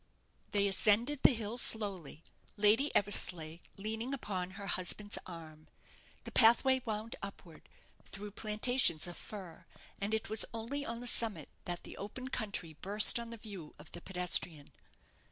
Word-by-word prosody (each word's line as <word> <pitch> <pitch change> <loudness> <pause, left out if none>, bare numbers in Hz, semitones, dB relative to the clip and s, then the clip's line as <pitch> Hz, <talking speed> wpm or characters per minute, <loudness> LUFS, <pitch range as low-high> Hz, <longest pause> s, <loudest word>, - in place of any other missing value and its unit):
They 200 -1 +2
ascended 225 +8 +3
the - - +8
hill 225 +2 -3
slowly, 195 -10 -1 0.3
Lady 215 +8 +4
Eversleigh 175 -5 0 0.2
leaning 220 +6 -3
upon 185 -8 -4
her 200 - -7
husband's 200 +2 +1
arm. 160 -3 -10 0.6
The - - -7
pathway 255 +3 +5
wound 220 0 -4
upward, 185 -5 -10 0.4
through 205 +1 -7
plantations 215 -5 +3
of 175 -1 -6
fir, 185 -6 -9 0.3
and 205 +2 0
it 220 - -3
was 220 0 +4
only 245 +6 -4
on 235 -3 -5
the - - -7
summit 220 - +1 0.2
that 175 0 -4
the - - -10
open 255 +6 -7
country 200 -9 -3
burst 210 +4 +5
on 235 0 -7
the 230 - -8
view 200 -8 -10
of 160 - -14
the 175 - -9
pedestrian. 175 -5 -2
205 Hz, 150 wpm, -33 LUFS, 180-225 Hz, 0.6 s, the